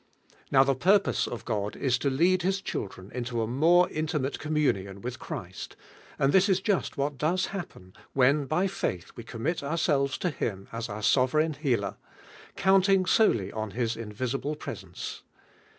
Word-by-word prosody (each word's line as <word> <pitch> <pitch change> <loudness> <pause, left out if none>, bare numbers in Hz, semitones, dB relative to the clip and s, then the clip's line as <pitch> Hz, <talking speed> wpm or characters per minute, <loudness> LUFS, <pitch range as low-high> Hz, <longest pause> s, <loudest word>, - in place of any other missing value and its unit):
Now 135 -1 +6
the 135 0 +2
purpose 190 +9 +3
of 120 - -6
God 105 -3 -2
is 125 -3 +1
to 140 - +1
Icinl 175 +7 +2
Ills 190 +1 0
Hiil'lreu 95 -1 -5
into 120 -1 -2
a - - -2
more 165 +9 +4
inli 155 0 -1
mate 135 +1 -3
communion 130 -11 0
with 125 +2 -5
Christ, - - -7 0.4
and 135 +1 +2
this 190 +2 +5
is 190 -1 +3
just 190 -4 -1
what 140 0 -2
does 175 +5 +1
happen, 95 - -7 0.2
when 140 +2 +3
by 160 +6 +1
faith 100 - -3
we 120 - -8
commit 130 +9 -3
ourselves 140 -2 +1
to 180 - -1
Him 100 -8 -4
as 115 0 -4
our 105 +1 -6
soverign 150 +7 +3
healer, 130 -8 -1 0.6
counting 190 0 +4
solely 115 - +3
on 110 -1 -4
His 120 -2 0
invis 115 +3 -4
ible 150 +1 -3
presence. - - -7
140 Hz, 165 wpm, -28 LUFS, 115-170 Hz, 0.6 s, Now